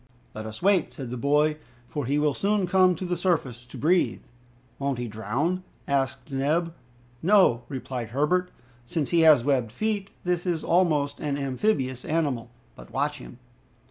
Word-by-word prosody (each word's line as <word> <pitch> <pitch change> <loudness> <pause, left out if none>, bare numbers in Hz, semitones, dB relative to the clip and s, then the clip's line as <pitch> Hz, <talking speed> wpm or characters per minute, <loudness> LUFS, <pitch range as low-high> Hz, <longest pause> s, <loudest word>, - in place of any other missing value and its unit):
"Let 110 0 -6
us 110 +8 -9
wait," 195 -4 +3
said 130 -4 -7
the - - -3
boy, 150 +4 +2 0.3
"for 140 +1 -4
he 140 +2 +1
will 150 -1 +2
soon 200 +2 +1
come 185 0 +4
to 185 - -5
the 175 0 -1
surface 135 -10 -1
to - - -10
breathe." 175 +4 +2 0.6
"Won't 140 -2 -1
he 120 0 -3
drown?" 120 - -1 0.3
asked 135 +1 -1
Neb. 155 +5 0 0.5
"No," 175 - +4
replied 130 -3 -4
Herbert, 150 +8 +1 0.4
"since 160 -3 -2
he 170 - +4
has 155 -7 +6
webbed 130 -6 +1
feet, 205 - -2 0.2
and 180 - +3
is 175 -4 -1
almost 155 -5 +2
an 145 -1 -2
amphibious 135 - -1
animal. 145 -7 -1 0.3
But - - -13
watch 145 +1 -1
him." 125 - -11
145 Hz, 165 wpm, -26 LUFS, 130-175 Hz, 0.6 s, has